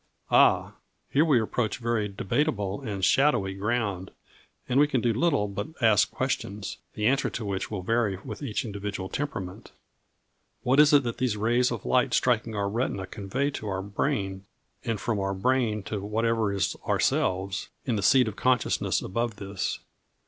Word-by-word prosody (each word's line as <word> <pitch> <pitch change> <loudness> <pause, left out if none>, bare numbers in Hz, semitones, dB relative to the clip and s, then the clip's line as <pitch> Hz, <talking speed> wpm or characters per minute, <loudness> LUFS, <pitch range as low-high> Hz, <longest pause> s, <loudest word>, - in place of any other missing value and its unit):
Ah! - - +5 0.4
Here 145 - +4
we 150 -7 +4
approach 110 0 -1
very 115 -3 0
debatable 100 +1 -1
and 100 -7 -2
shadowy 135 -9 +3
ground, 100 -2 -2 0.6
and 130 +2 +2
we 145 - +6
can 130 -3 +1
do 115 0 +1
little 135 -4 +2
but 100 +1 -4
ask 110 -5 +4
questions, 100 0 -3 0.2
the 105 - -2
answer 135 +4 +2
to 115 - -5
which 100 -1 -3
will 100 -4 -4
vary 115 -1 +1
with - - -7
each 130 -1 -2
individual 100 -2 -5
temperament. 100 -11 -5 0.9
What 130 +3 +3
is 150 -1 +7
it 145 -2 +6
that 120 -2 -4
these 120 -4 0
rays 120 +4 +2
of 120 -4 -5
light 125 - +2
striking 115 -3 +1
our 100 -1 0
retina 100 -3 -2
convey 125 +10 -2
to 110 - -6
our 95 -1 -2
brain, 100 -3 -2 0.4
and 115 -4 -2
from 110 -3 -1
our 95 0 -1
brain 110 -1 +1
to 105 +1 -4
whatever 110 +1 0
is 100 -1 0
ourselves, 95 +1 0 0.2
in 120 - 0
the 105 - -1
seat 125 +4 +5
of 105 - -4
consciousness 125 +1 +1
above 115 +3 -2
this? 100 -1 -4
110 Hz, 170 wpm, -27 LUFS, 100-125 Hz, 0.9 s, is